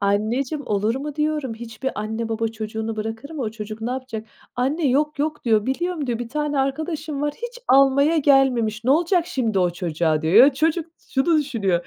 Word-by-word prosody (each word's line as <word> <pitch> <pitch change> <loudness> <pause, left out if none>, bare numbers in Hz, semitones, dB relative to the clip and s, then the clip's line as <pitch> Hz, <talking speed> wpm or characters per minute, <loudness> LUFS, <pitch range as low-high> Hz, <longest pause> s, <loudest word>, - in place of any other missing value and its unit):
"Anneciğim 235 +8 0
olur 210 +2 +1
mu?" 285 +2 -5
diyorum. 300 -5 -1
"Hiçbir 235 +3 -5
anne 220 +2 -3
baba 225 0 -1
çocuğunu 220 0 -5
bırakır 225 +6 -5
mı? 310 -5 -4
O 220 - -2
çocuk 215 0 -7
ne 230 +2 -2
yapacak?" 250 -4 -5 0.3
"Anne 285 +6 0
yok 295 +3 +1
yok." 300 +1 -2
diyor, 220 -3 +2
"Biliyorum." 315 +2 -2
diyor, 235 -2 -1
"Bir 240 -1 -5
tane 295 +1 -1
arkadaşım 300 +2 -2
var, 295 0 0
hiç 480 +1 -7
almaya 275 +4 +5
gelmemiş, 250 -6 +3
ne 260 - +2
olacak 340 +3 +3
şimdi 225 -6 -1
o 180 -1 +2
çocuğa?" 165 -3 -1
diyor. 160 +4 0
Ya, 260 +6 +8
çocuk 320 +3 +1 0.2
şunu 310 +4 +3
düşünüyor: 205 - -1
255 Hz, 185 wpm, -22 LUFS, 220-295 Hz, 0.3 s, Ya